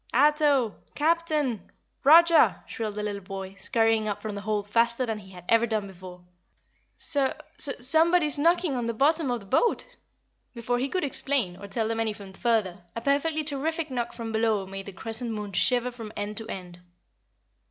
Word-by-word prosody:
"Ato! 290 -4 +3 0.2
Captain! 305 - 0 0.3
ROGER!" 330 +3 +6
shrilled 215 -3 -5
the 210 - -3
little 205 -1 -3
boy, 190 0 -7
scurrying 225 +2 +1
up 205 - -2
from 215 -1 -5
the 200 - -5
hold 210 -1 -2
faster 235 +3 +2
than 220 -2 -3
he 190 -2 -14
had 180 -1 -12
ever 230 +1 +4
done 215 -2 -1
before. 180 -2 -12 0.7
"Su 285 -4 +4 0.3
su 275 - 0
SOMEBODY'S 315 +3 +3
knocking 335 -1 +2
on 240 -2 -2
the 230 - -2
bottom 300 +3 +2
of 245 -2 -1
the - - -14
boat." 480 - 0 0.6
Before 245 +1 -1
he 265 +2 -1
could 370 +4 -1
explain, 265 -8 -1
or 200 +2 -10
tell 220 +3 -1
them 225 0 -2
anything 210 -3 -4
further, 200 -6 0
a 230 - -4
perfectly 295 +4 +1
terrific 305 +2 -3
knock 240 -2 -2
from 230 -1 -6
below 220 -3 +1
made 195 +1 -8
the - - -6
Crescent 225 +5 -4
Moon 210 -3 -5
shiver 250 +5 +2
from 225 -3 -9
end 205 +1 -4
to 225 - -4
end. 180 -2 -8
230 Hz, 180 wpm, -26 LUFS, 205-285 Hz, 0.7 s, ROGER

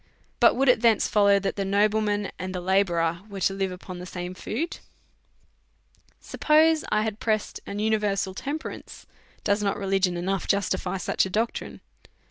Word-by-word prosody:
But - - +6
would 270 +2 +1
it 250 -3 +5
thence 230 -3 +4
follow 200 -1 +4
that 195 +1 -2
the 200 - 0
nobleman 205 +1 +1
and 185 0 -4
the - - -2
la 190 +2 +3
bourer 170 -2 -1
were 195 -1 -7
to 195 - +2
live 195 -1 -2
upon 180 0 -8
the 180 - -8
same 180 0 -6
food? 265 - -4 1.4
Suppose 315 +1 +3
I 215 0 +2
had 220 -1 -3
pressed 215 -2 -1
an 200 - -5
universal 210 -3 0
temperance, 285 +9 -6 0.4
does 205 +1 +1
not 200 -1 0
religion 195 -2 0
enough 190 +1 -2
justify 190 -2 0
such 190 - 0
a - - -8
doctrine? 225 +5 -3
200 Hz, 165 wpm, -25 LUFS, 185-215 Hz, 1.4 s, But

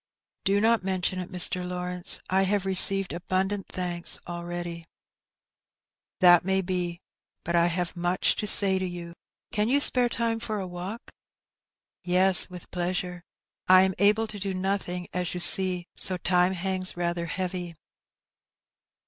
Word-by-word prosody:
" - - -56
Do 200 +1 +2
not 225 +2 +1
mention 185 0 -3
it, 180 - -7
Mr. 180 0 +2
Lawrence; 180 0 +2
I 190 +1 0
have 195 0 -1
received 195 0 +3
abundant 190 +3 -3
thanks 175 -1 0
already." 175 -1 -7 1.4
"That 175 -2 +6
may 190 +1 0
be, 180 -2 -5 0.4
but 170 - -3
I 170 0 +3
have 175 +1 -3
much 175 +1 0
to 210 - -3
say 195 -2 +4
to 185 - -3
you; 175 -1 -9 0.4
can 210 +2 -1
you 280 +3 +2
spare 250 -3 +5
time 230 -1 -3
for 215 -2 -5
a 190 - -5
walk? 180 +5 -9 0.3
" - - -68
" - - -67
Yes, 185 +1 +4
with 180 -1 -13
pleasure; 180 0 -4 0.5
I 185 0 +6
am 190 0 0
able 210 +3 +2
to 215 -2 -10
do 195 -1 -4
nothing, 185 -2 -4
as 180 -1 -4
you - - -4
see, 185 +1 +6
and 175 -1 -10 0.2
so 185 - +4
time 180 +1 0
hangs 185 0 -2
rather 170 -1 -3
heavy." 180 -1 -5
185 Hz, 160 wpm, -25 LUFS, 175-195 Hz, 1.4 s, That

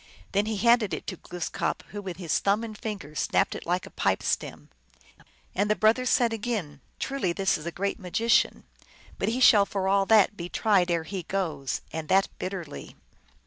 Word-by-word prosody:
Then 200 +2 +1
he 220 -1 -1
handed 235 -1 +3
it - - -8
to 185 - -5
Glooskap, 175 +1 -3
who 205 - -6
with 185 -4 -6
his 175 -4 0
thumb 200 +3 +1
and 220 -2 -6
fingers 200 -9 -6
snapped - - +1
it - - -8
like 180 +1 0
a - - -12
pipe - - 0
stem. - - -3 0.8
And 205 - 0
the 215 - +3
brothers 230 +4 +3
said 240 -3 +3
again, 210 - -3
" - - -39
Truly, 270 -11 -1
this 195 +1 +1
is 155 +2 -6
a - - -2
great 200 +3 -2
maoician. 220 +6 +2 0.6
But 195 - 0
he 240 +3 -1
shall 210 -5 +6
for 190 -1 -2
all 195 0 +3
that 215 -1 +5
be 175 -2 -6
tried 195 -4 +2
ere 170 -2 +1
he 195 +3 -5
O - - -6
goes, 160 -9 -2
and 160 -1 -5
that 195 +1 +4
bitterly." 185 -6 -6
195 Hz, 200 wpm, -27 LUFS, 175-215 Hz, 0.8 s, shall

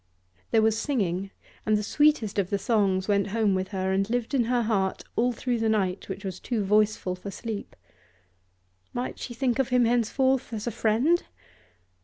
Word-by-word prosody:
There 220 - +3
was 220 0 +2
singing, 195 - -1 0.3
and 215 0 +2
the 210 - -2
sweetest 270 -5 +2
of 190 -2 0
the 200 - +1
songs 195 -3 +1
went 200 -1 +2
home 210 -1 +1
with 185 0 -1
her 190 -1 -2
and 195 +2 +1
lived 240 +2 -1
in 250 -4 +3
her 240 0 +1
heart 195 -4 0
all 245 +2 +2
through 240 -1 -2
a 220 - +2
night 195 -4 0
which 195 +1 -6
was 185 -2 -5
too 230 -4 -2
voiceful 210 -2 +2
for 180 +2 -7
sleep. 215 +1 -6 1.2
Might 245 +1 -4
she 240 - -6
think 255 +1 0
of 270 - +1
him 250 -1 +4
henceforth 245 +2 +1
as 215 -1 -4
a 240 - -1
friend? 235 +10 +2
220 Hz, 185 wpm, -26 LUFS, 195-240 Hz, 1.2 s, him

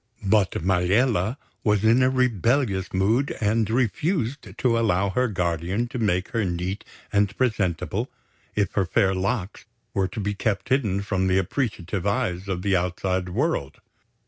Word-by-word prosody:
But 100 -1 +3
Maliella 95 +5 +2 0.3
was 105 -2 +2
in 115 +3 +5
a 130 - +4
rebellious 120 - +1
mood 110 +9 +1
and 110 0 +1
refused 125 - -1
to 115 -2 +2
allow 100 -3 +1
her 125 +4 +1
guardian 90 +2 -1
to 125 - -5
make 90 -4 0
her 115 -2 0
neat 90 +2 -3 0.3
and 100 -1 +2
presentable 100 -10 0 0.5
if 100 -4 +1
her 95 -3 0
fair 95 +2 +2
looks 95 +1 -2 0.3
were 95 -1 +1
to 110 - -7
be 105 0 -1
kept 100 +2 -2
hidden 105 -7 +1
from 95 -2 0
the 95 0 +3
appreciative 95 -3 -2
eyes 95 -2 -1
of 90 -2 -3
the 100 -2 +2
outside 90 +1 -1
world. 115 - -1
100 Hz, 150 wpm, -24 LUFS, 95-115 Hz, 0.5 s, in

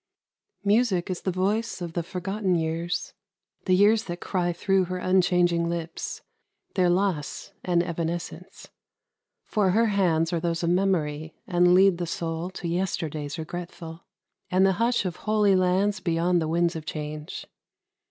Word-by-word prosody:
Music 200 -4 +2
is 180 - -4
the 190 - -1
voice 200 +6 -1
of 170 -2 -5
the 170 - -1
forgotten 190 +2 -2
years 165 +1 -2 0.5
The 185 - +4
years 210 +3 +4
that 175 0 -5
cry 175 -2 -1
thro' 190 +2 +1
her 185 +1 -4
unchanging 180 -2 +2
lips 170 -1 -5 0.5
Their 180 -2 +3
loss 175 -5 -1
and 175 -1 +2
evanescence. 170 0 -5 0.8
For 205 -4 +1
her 225 +5 +3
hands 165 -4 +2
Are 170 - +1
those 170 0 -2
of 170 - +2
Memory, 160 -5 0
and 175 0 +4
lead 190 -1 +5
the 175 - -2
soul 165 +1 -3
To 185 -1 -6
yesterdays 160 -4 -2
regretful, 170 0 -7 0.5
and 185 +1 +4
the 190 - +4
hush 235 -3 +2
Of 175 -3 -3
holy 210 -2 +2
lands 185 +3 +2
beyond 170 +1 +1
the 160 - -1
winds 170 +1 +1
of 160 - -5
change. 150 0 -6
175 Hz, 150 wpm, -26 LUFS, 165-190 Hz, 0.8 s, lead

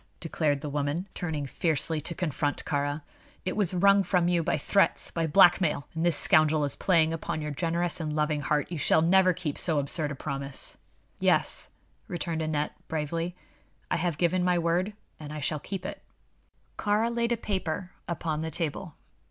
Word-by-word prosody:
declared 155 -4 0
the 150 - -4
woman, 145 +5 -2
turning 155 -5 -3
fiercely 155 +2 -1
to 170 +4 -4
confront 150 -4 -2
Kāra. 145 +1 -1 0.4
"It 185 - -1
was 200 -5 +1
wrung 200 +2 +5
from 180 -3 +2
you 175 -1 +2
by 160 - 0
threats 195 +7 +2
by 165 -1 -1
blackmail 175 -3 +4
and 160 0 -2
this 170 -3 +3
scoundrel 155 -1 +4
is 145 - 0
playing 165 -3 +3
upon 160 -1 -3
your 150 -1 -3
generous 170 +2 -1
and 155 -2 -3
loving 150 -1 +1
heart. 150 +3 0
You 170 - -3
shall 160 +3 +4
never 185 +2 +5
keep 165 -4 -4
so 160 -4 +1
absurd 145 +2 -1
a 145 - -4
promise." 140 -1 -3 0.4
"Yes," - - +2 0.4
returned 170 -1 -2
Aneth, 155 -1 -1 0.2
bravely; 165 +3 -2 0.6
"I - - +2
have 170 -2 -1
given 180 +2 +2
my 180 -1 +3
word, 175 +4 +1 0.3
and 150 -1 -8
I 155 - -5
shall 150 +1 -1
keep 185 +4 -6
it." - - -6 0.8
Kāra 220 +3 +1
laid 235 0 0
a 235 - +2
paper 185 -4 -3 0.2
upon 160 -2 -2
the 160 +1 -2
table. 160 +1 -3
165 Hz, 175 wpm, -28 LUFS, 150-180 Hz, 0.8 s, wrung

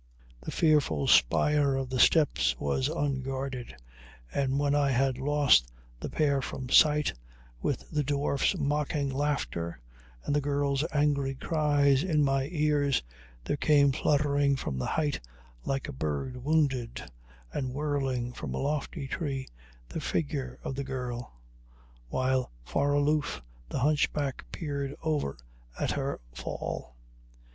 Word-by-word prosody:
The - - -6
fearful 145 - +2
spire 140 - +4
of 135 -1 -3
the 130 - -1
steps 65 - +4
was 100 - 0
unguarded, 135 - -3 0.6
and 135 -1 +1
when 145 0 +2
I 145 -1 +3
had 130 0 +1
lost 140 - +4 0.3
the - - -5
pair 140 -3 +1
from 130 0 -5
sight, 150 +2 +5 0.5
with 140 - -2
the 150 -2 +1
dwarf's 140 +5 +1
mocking 145 -1 0
laughter 130 - -2 0.5
and 145 - 0
the 145 - +2
girl's 140 0 0
angry 145 -2 +1
cries 145 -2 +2
in 155 -5 +2
my 135 -1 +1
ears, 150 - +2 0.4
there 145 - -1
came 145 -2 +4
fluttering 145 0 +2
from 65 - -3
the - - -2
height, 150 -3 0 0.5
like 135 -1 -1
a - - -6
bird 75 - -3
wounded 135 -6 +1 0.5
and 130 -2 -2
whirling 135 -4 -1
from - - -5
a - - -2
lofty 140 -1 -2
tree, 135 -3 -3 0.4
the - - -5
figure 140 -5 -2
of - - -3
the 140 +1 -3
girl, 125 -2 -5 0.8
while 130 - +1 0.2
far 140 - +1
aloof 145 - +1 0.3
the - - -3
hunchback 145 -1 +1
peered 140 -3 -3
over 150 - -1 0.4
at - - 0
her 140 -1 -2
fall. 65 0 -5
140 Hz, 135 wpm, -29 LUFS, 130-145 Hz, 0.8 s, sight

